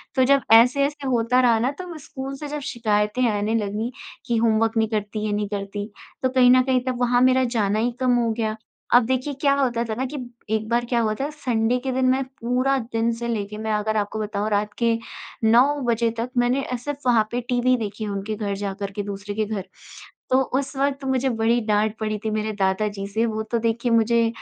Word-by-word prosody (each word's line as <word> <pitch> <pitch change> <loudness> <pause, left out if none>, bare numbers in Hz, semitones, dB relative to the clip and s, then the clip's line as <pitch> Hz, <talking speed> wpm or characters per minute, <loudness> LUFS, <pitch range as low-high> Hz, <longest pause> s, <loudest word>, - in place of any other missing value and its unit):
तो 260 - +4
जब 275 +1 +4
ऐसे-ऐसे 280 +5 +4
होता 250 0 +2
रहा 235 -2 +4
ना 250 +4 +1
तब 360 -2 -7
स्कूल 270 -1 -7
से 300 - -6
जब 295 +1 -4
शिकायतें 215 +1 +1
आने 210 +2 -1
लगी 215 +2 -2 0.3
कि 235 -1 0
होमवर्क 225 0 +2
नहीं 220 0 +3
करती 210 0 -3
ये 210 - -1
नहीं 205 0 -1
करती 205 0 -4 0.4
तो 260 - +3
कहीं 255 -1 +5
न 255 0 +6
कहीं 255 -1 +1
तब 250 -1 -1
वहाँ 245 0 +3
मेरा 255 0 +4
जाना 205 0 +1
ही 240 +2 +1
कम 255 -1 +3
हो 235 -2 +1
गया। 220 -1 -2 0.4
अब 245 -2 +6
देखिए 260 +3 -1
क्या 280 -2 +4
होता 245 -4 +1
था 220 -1 -3
ना 260 +3 -2
कि, 290 +3 -6 0.3
एक 220 0 -1
बार 240 0 +1
क्या 240 0 0
हुआ 215 -1 +1
था 285 - -1
सँडे 245 -5 0
के 260 +1 -3
दिन 260 0 +1
मैं 265 +1 +2 0.2
पूरा 255 +3 +1 0.2
दिन 225 +1 +1
से 235 +1 -5
लेके 210 -2 -3
मैं 220 0 -3
अगर 215 +1 0
आपको 210 +1 -2
बताऊँ 210 0 -2
रात 210 0 0
के 230 -1 +3 0.5
9 230 +3 +6 0.3
बजे 230 0 +2
तक 235 +2 -2
मैंने 245 +3 +2
अ, 250 - -3
सिर्फ़ 285 +4 -5
वहाँ 225 -3 +4
पे 245 - -1
टीवी 250 +1 +3
देखी 215 -1 -4
उनके 200 +1 -3
घर 205 -2 -3
जाकर 200 0 -4
के 205 +1 -4
दूसरे 200 0 -6
के 215 0 0
घर। 205 -3 -4 0.6
तो 260 - +5 0.2
उस 275 0 -5
वक़्त 275 0 0
मुझे 265 0 +1
बड़ी 230 +2 +2
डाँट 210 +1 +1
पड़ी 215 -1 -2
थी - - +1
मेरे 215 0 -1
दादा 190 +2 +1
जी 200 -1 -5
से। 220 +3 0
वो 220 -1 -2
तो 235 - +1
देखिए 235 +1 0
मुझे 230 0 +3
230 Hz, 225 wpm, -23 LUFS, 215-255 Hz, 0.6 s, न